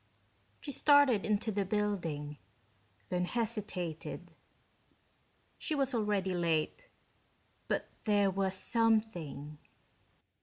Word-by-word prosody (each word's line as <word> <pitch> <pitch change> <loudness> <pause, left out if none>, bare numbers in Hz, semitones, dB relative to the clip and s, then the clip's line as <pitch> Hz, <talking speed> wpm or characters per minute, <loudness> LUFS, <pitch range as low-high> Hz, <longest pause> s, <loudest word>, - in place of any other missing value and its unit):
She 285 - -5
started 285 -8 +5
into 215 +1 +1
the 200 -1 0
building, 175 -8 -2 0.7
then 180 0 0
hesitated. 205 -7 -3 1.3
She 310 - -1
was 275 -2 0
already 205 -4 0
late, 170 - -1 0.8
but - - -1 0.2
there 205 -2 +3
was 190 0 -1
something.... 190 - 0
205 Hz, 85 wpm, -33 LUFS, 175-225 Hz, 1.3 s, started